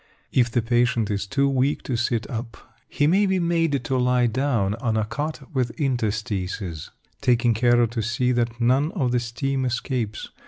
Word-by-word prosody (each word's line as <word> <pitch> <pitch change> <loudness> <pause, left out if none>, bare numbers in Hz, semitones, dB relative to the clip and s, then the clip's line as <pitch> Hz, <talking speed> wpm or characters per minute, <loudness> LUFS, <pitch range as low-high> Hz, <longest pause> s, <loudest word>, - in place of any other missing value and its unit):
If 120 -2 +3
the 120 -1 0
patient 120 -2 +1
is 100 0 -2
too 140 +7 +1
weak 135 +1 +1
to 130 - -2
sit 120 -2 -1
up, 115 -1 -6 0.3
he 145 - +1
may 195 +6 +4
be 190 0 +1
made 165 -6 +1
to 130 +2 -1
lie 125 0 +3
down 120 -4 0
on 115 -3 0
a 110 - +1
cot 150 +3 -4
with 125 +1 -1
interstices, 105 - -2 0.3
taking 120 -2 +3
care 120 +1 +4
to 115 0 -3
see 115 +4 0
that 120 -1 -1
none 130 +6 +2
of 135 - 0
the 125 - +2
steam 130 +3 -2
escapes. 120 -3 -2
120 Hz, 180 wpm, -24 LUFS, 115-135 Hz, 0.3 s, may